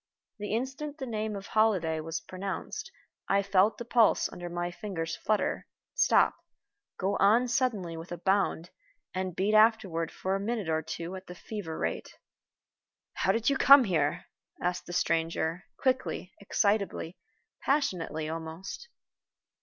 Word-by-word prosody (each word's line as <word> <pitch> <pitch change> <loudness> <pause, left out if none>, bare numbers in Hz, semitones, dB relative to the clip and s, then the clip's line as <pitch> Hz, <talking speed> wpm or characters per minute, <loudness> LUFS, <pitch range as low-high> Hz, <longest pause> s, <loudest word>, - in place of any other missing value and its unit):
The 210 +1 -2
instant 270 +5 -4
the 270 - -4
name 215 -3 -3
of 195 -1 -6
Holliday 190 -8 +2
was 160 +1 -4
pronounced 195 - -5 0.4
I 200 - +3
felt 195 +2 +3
the 235 - -6
pulse 235 -2 +4
under 175 0 -6
my 175 0 -3
fingers 170 -4 -4
flutter, 215 -1 -1 0.3
stop, - - +4 0.6
go 195 +1 0
on 225 +6 +5
suddenly 235 -9 0
with 165 +2 -9
a 175 - -3
bound, 190 -1 0 0.4
and 185 -1 -3
beat 200 +4 +1
afterward 215 -7 +4
for 190 - -2
a - - -1
minute 210 -3 -2
or 160 0 +1
two 170 +3 -5
at 190 0 -9
the 180 - -8
fever 180 -4 -6
rate. 80 0 -3 1.0
"How 190 - +2
did 230 +5 +1
you 275 - +1
come 275 +1 +9
here?" 165 -9 0 0.3
asked 180 0 -2
the - - -6
stranger, 165 +1 0
quickly, 255 -7 -1
excitably, 200 -4 0 0.4
passionately 180 - 0
almost. 165 - -6
195 Hz, 145 wpm, -29 LUFS, 170-220 Hz, 1.0 s, come